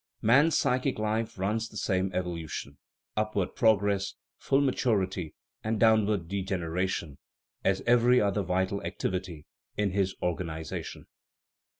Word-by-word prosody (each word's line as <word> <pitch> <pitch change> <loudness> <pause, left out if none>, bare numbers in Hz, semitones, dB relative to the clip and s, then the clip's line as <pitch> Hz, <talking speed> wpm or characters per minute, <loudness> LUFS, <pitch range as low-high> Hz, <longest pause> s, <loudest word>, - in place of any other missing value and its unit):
Man's 140 +8 +5
psychic 130 +1 +1
life 110 +1 -1
runs 110 +4 -1
the - - -9
same 95 -1 0
evolution 85 -6 -4 0.4
upward 105 -3 -1
progress, 100 -3 +2 0.2
full 135 - +2
maturity, 100 - 0 0.3
and 110 0 -1
downward 110 -5 +3
degeneration 90 -4 -2 0.4
as 95 0 +2
every 120 +1 +5
other 100 0 +1
vital 95 +1 0
activity 90 -5 -4 0.3
in 105 -2 +1
his 95 0 0
organization. 80 -2 -4
100 Hz, 110 wpm, -29 LUFS, 90-110 Hz, 0.4 s, Man's